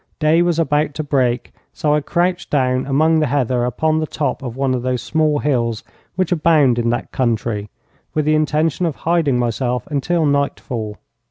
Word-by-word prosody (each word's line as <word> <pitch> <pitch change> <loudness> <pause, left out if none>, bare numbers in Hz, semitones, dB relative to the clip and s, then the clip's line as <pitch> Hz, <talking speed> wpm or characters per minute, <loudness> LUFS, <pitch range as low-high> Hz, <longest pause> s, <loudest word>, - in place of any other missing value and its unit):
Day 160 +2 +3
was 175 -2 +1
about 150 -2 +1
to 155 - -2
break, 130 -4 0 0.2
so 150 -1 0
I 150 - +2
crouched 175 +4 -1
down 130 -2 +1
among 155 +4 +3
the 155 - +1
heather 125 -2 0
upon 155 +6 0
the 155 - -2
top 150 -1 -2
of 125 -3 -6
one 135 -1 0
of 125 - -1
those 125 -1 -2
small 155 -2 +1
hills 120 -6 -1 0.3
which 185 0 -1
abound 150 -7 +3
in 115 0 0
that 120 - -2
country, 115 -4 -1 0.5
with 155 -1 +1
the 155 - +3
intention 155 +2 +1
of 155 - -3
hiding 165 -6 +1
myself 120 0 -1
until 160 +4 0
nightfall. 130 -7 -2
145 Hz, 180 wpm, -19 LUFS, 125-155 Hz, 0.5 s, Day